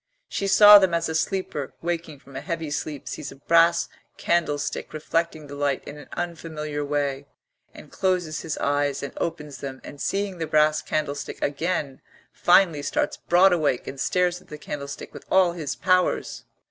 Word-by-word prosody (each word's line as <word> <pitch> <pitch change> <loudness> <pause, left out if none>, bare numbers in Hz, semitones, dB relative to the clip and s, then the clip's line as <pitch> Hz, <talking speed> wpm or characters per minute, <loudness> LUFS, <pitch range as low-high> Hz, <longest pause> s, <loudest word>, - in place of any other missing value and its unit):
She 200 - -2
saw 205 +1 +9
them 190 -3 +2
as 170 0 0
a - - -2
sleeper 160 -4 -2
waking 165 -3 -3
from 135 0 -17
a 130 - -4
heavy 165 -3 -4
sleep 150 -1 -4
sees 140 - -6
a - - -11
brass 170 +4 +3 0.3
candlestick 160 -4 -1
reflecting 155 0 -2
the 145 - -10
light 140 -1 -1
in 150 - -9
an - - -12
unfamiliar 155 -4 -4
way, 140 -1 -2 0.4
and - - -14
closes 180 -4 -1
his 155 - -4
eyes 145 -1 0
and 140 - -5
opens 150 -4 -4
them, 135 -1 -6
and 145 - -10
seeing 195 -2 -2
the 160 - -2
brass 155 0 +3
candlestick 145 -2 -3
again, 145 -2 -2 0.3
finally 175 -4 +4
starts 145 - -1
broad 180 +2 +4
awake 150 -7 0
and 135 - -7
stares 180 +3 +1
at - - -22
the 150 - -8
candlestick 145 -1 -7
with - - -11
all 185 -2 +4
his 155 -4 -4
powers. 185 -1 +1
155 Hz, 170 wpm, -24 LUFS, 145-175 Hz, 0.4 s, saw